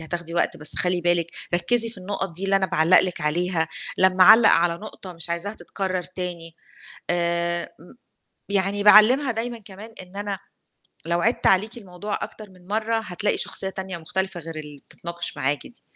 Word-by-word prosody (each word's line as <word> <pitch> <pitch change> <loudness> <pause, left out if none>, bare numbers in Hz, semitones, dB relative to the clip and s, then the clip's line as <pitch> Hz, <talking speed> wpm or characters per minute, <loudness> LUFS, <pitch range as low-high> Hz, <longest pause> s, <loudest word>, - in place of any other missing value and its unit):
هتاخدي 170 +1 -5
وقت، 170 - +1
بس 150 0 -1
خلّي 180 0 +1
بالِك 175 -1 +2 0.3
ركِّزي 230 +5 +2
في 205 - -8
النُقَط 190 -1 -3
دي 195 - -2
اللي 195 0 +3
أنا 190 - +1
باعلَّق 165 +1 +5
لِك 180 -2 -3
عليها، 165 +2 0 0.3
لمّا 185 0 +4
أعلَّق 220 +3 +8
على 170 0 +3
نقطة 195 -2 -10
مش 165 0 -5
عايزاها 175 +5 -2
تتكرَّر 185 -4 -4
تاني. 175 -2 -7 0.6
آآ، 170 0 0 0.2
م - - -16 0.6
يعني 200 +1 +1
باعلِّمها 235 +6 +6
دايمًا 235 +1 -4
كمان 205 +2 -11
إن 185 +1 -15
أنا 200 -1 -3 0.7
لو 170 +1 0
عِدْت 230 +3 +1
عليكِ 215 +5 +2
الموضوع 205 -1 -5
أكتر 215 -2 -7
من 180 -1 -20
مرّة 220 +2 -1
هتلاقي 205 -1 0
شخصية 190 - -1
تانية 190 -2 -6
مختلفة 190 +2 -3
غير 165 0 -7
اللي 150 -2 -9
بتتناقش 170 -2 -6
معاكِ 145 +1 0
دي. 240 - -18
185 Hz, 175 wpm, -23 LUFS, 170-205 Hz, 0.7 s, أعلَّق